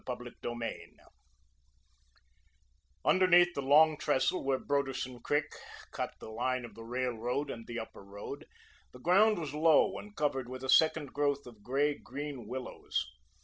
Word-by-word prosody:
CHAPTER 125 Hz, -1 st, -5 dB
II 120 Hz, -1 st, -4 dB, 2.2 s
Underneath 175 Hz, -1 st, +5 dB
the 140 Hz, -, -2 dB
Long 150 Hz, +3 st, +5 dB
Trestle 150 Hz, +3 st, +1 dB
where 135 Hz, -1 st, +1 dB
Broderson 135 Hz, -3 st, -2 dB
Creek 145 Hz, +5 st, +1 dB, 0.5 s
cut -, -, -4 dB
the -, -, -9 dB
line 125 Hz, +2 st, -1 dB
of 120 Hz, -, -11 dB
the 115 Hz, -, -10 dB
railroad 125 Hz, +2 st, -2 dB
and 115 Hz, -1 st, -8 dB
the 120 Hz, -, -5 dB
Upper 110 Hz, -2 st, -9 dB
Road, 100 Hz, +1 st, -8 dB, 0.5 s
the 125 Hz, -, -12 dB
ground 205 Hz, +8 st, +4 dB
was 155 Hz, -5 st, -4 dB
low 155 Hz, 0 st, +4 dB
and 210 Hz, 0 st, -12 dB
covered 135 Hz, -6 st, -1 dB
with 130 Hz, 0 st, -7 dB
a 130 Hz, -, -5 dB
second 155 Hz, -1 st, +4 dB
growth 145 Hz, -1 st, 0 dB
of 115 Hz, -4 st, -13 dB
grey 140 Hz, +6 st, +1 dB
green 140 Hz, -3 st, -6 dB
willows. 130 Hz, -, -3 dB
135 Hz, 145 wpm, -32 LUFS, 125-150 Hz, 2.2 s, Underneath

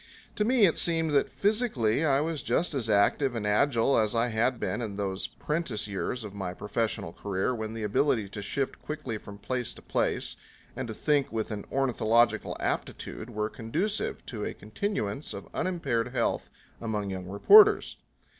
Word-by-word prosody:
To 210 Hz, -, +3 dB
me 235 Hz, -1 st, +5 dB
it 165 Hz, -, +2 dB
seemed 165 Hz, -2 st, +2 dB
that 140 Hz, -1 st, +3 dB
physically 200 Hz, -, +1 dB
I 140 Hz, -3 st, +3 dB
was 160 Hz, -1 st, -2 dB
just 170 Hz, -, 0 dB
as 125 Hz, -5 st, -2 dB
active 115 Hz, +6 st, +3 dB
and 110 Hz, -2 st, -2 dB
agile 115 Hz, +4 st, +3 dB
as 110 Hz, +1 st, +1 dB
I 115 Hz, +1 st, +2 dB
had 120 Hz, +3 st, +1 dB
been 100 Hz, +3 st, -2 dB
in 105 Hz, -4 st, -4 dB
those 95 Hz, -1 st, -2 dB
'prentice 145 Hz, -10 st, -3 dB
years 105 Hz, +4 st, -3 dB
of 105 Hz, -2 st, -7 dB
my 95 Hz, -3 st, -4 dB
professional 105 Hz, -5 st, -2 dB
career 100 Hz, +4 st, -1 dB
when 110 Hz, -1 st, -4 dB
the 110 Hz, -, -4 dB
ability 105 Hz, 0 st, +1 dB
to 100 Hz, -, -6 dB
shift 135 Hz, +7 st, -3 dB
quickly 150 Hz, -8 st, -5 dB
from 100 Hz, -1 st, -10 dB
place 125 Hz, +3 st, -3 dB
to -, -, -13 dB
place -, -, -1 dB, 0.4 s
and -, -, -4 dB
to 110 Hz, -, -6 dB
think 145 Hz, +1 st, +1 dB
with 110 Hz, -1 st, -2 dB
an 105 Hz, -1 st, -5 dB
ornithological 120 Hz, -3 st, +2 dB
aptitude 110 Hz, -, -3 dB
were 105 Hz, -2 st, -1 dB
conducive 160 Hz, -, -2 dB
to 110 Hz, -4 st, -5 dB
a -, -, -3 dB
continuance 110 Hz, -, -3 dB
of -, -, -8 dB
unimpaired 165 Hz, -11 st, -1 dB
health 125 Hz, +1 st, -1 dB, 0.3 s
among 105 Hz, -3 st, -2 dB
young 95 Hz, -1 st, -5 dB
reporters. 410 Hz, -, +6 dB
115 Hz, 175 wpm, -28 LUFS, 105-145 Hz, 0.4 s, reporters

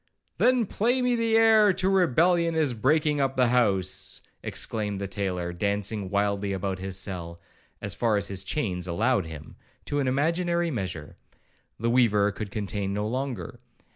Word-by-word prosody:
'Then 250 Hz, -2 st, +4 dB
play 240 Hz, +6 st, +1 dB
me 250 Hz, -1 st, +2 dB
the 230 Hz, -1 st, +1 dB
air 220 Hz, -2 st, +6 dB
to 185 Hz, 0 st, -1 dB
Rebellion 175 Hz, -2 st, +3 dB
is 150 Hz, -5 st, +2 dB
breaking 150 Hz, +5 st, +2 dB
up 135 Hz, -1 st, -1 dB
house,' 95 Hz, -7 st, +1 dB, 0.2 s
exclaimed 105 Hz, -2 st, -2 dB
the 100 Hz, 0 st, -4 dB
tailor, 90 Hz, -3 st, -3 dB
dancing 100 Hz, +2 st, -2 dB
wildly 100 Hz, 0 st, 0 dB
about 95 Hz, -1 st, -3 dB
his 95 Hz, 0 st, -3 dB
cell 85 Hz, -4 st, -5 dB, 0.4 s
(as 100 Hz, -1 st, -2 dB
far 115 Hz, -3 st, +1 dB
as 100 Hz, -, -2 dB
his 95 Hz, -1 st, -3 dB
chains 95 Hz, -, -2 dB
allowed 105 Hz, +2 st, +1 dB
him) 80 Hz, -1 st, -10 dB, 0.3 s
to 145 Hz, -, -1 dB
an 135 Hz, -, 0 dB
imaginary 170 Hz, +5 st, +1 dB
measure. 90 Hz, -, -5 dB, 0.6 s
The 115 Hz, +2 st, 0 dB
weaver 105 Hz, -5 st, +3 dB
could 100 Hz, +1 st, -6 dB
contain 100 Hz, -1 st, -3 dB
no 105 Hz, +1 st, -1 dB
longer. 125 Hz, -6 st, -4 dB
105 Hz, 155 wpm, -26 LUFS, 95-155 Hz, 0.6 s, air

